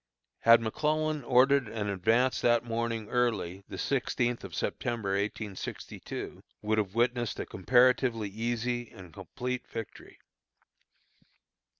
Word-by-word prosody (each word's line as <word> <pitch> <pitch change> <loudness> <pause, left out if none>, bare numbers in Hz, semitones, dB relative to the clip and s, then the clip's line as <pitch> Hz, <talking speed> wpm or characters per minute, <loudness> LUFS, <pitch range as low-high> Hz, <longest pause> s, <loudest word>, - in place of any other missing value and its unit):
Had 115 0 +7
McClellan 155 +5 0
ordered 130 +1 +4
an 105 -1 -3
advance 115 +7 +2
that 120 -1 +3
morning 115 -1 -2
early, 105 -7 0
the - - -6
sixteenth 120 -3 -1
of - - -8
September, 115 -5 -2
1862, 100 0 -5 0.2
would 110 +1 +1
have 100 -1 -2
witnessed 120 -1 0
a - - -3
comparatively 120 +1 +3
easy 120 +3 -2
and 90 -6 -13
complete 125 +8 -5
victory. 115 -2 -8
115 Hz, 110 wpm, -30 LUFS, 105-125 Hz, 0.2 s, Had